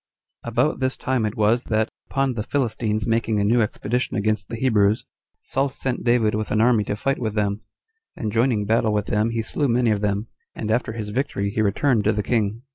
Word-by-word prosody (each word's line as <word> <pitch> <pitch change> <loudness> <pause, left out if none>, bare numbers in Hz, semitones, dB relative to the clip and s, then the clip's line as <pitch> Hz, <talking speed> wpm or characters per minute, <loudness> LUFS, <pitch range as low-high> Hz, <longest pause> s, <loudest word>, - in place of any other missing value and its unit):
3. - - -5
About 125 +7 +1
this 130 0 -1
time 130 -4 0
it 105 - -6
was 110 +3 +2
that, 110 0 +1 0.2
upon 135 -2 0
the 110 - -3
Philistines 110 -4 -1
making 115 -2 +1
a - - +2
new 115 +4 +3
expedition 115 +3 -1
against 105 -2 -1
the - - -4
Hebrews, 110 -4 +2 0.4
Saul 135 +2 0
sent 130 -1 -3
David 120 -3 +3
with 110 0 -2
an 110 - +1
army 115 -2 +4
to 100 - -2
fight 135 +6 -1
with 110 -3 -2
them; 105 0 0 0.5
and 110 -3 -3
joining 115 -2 +1
battle 110 0 +2
with 105 -1 0
them 105 +2 +1
he 115 -1 -2
slew 145 +6 -1
many 120 -1 +2
of 105 -1 0
them, 105 +1 0 0.3
and 110 -1 -3
after 110 -1 0
his 110 -2 -5
victory 105 -4 -1
he 110 - 0
returned 110 +3 +2
to 110 - +3
the 105 0 -1
king. 110 0 0
110 Hz, 215 wpm, -23 LUFS, 105-125 Hz, 0.5 s, army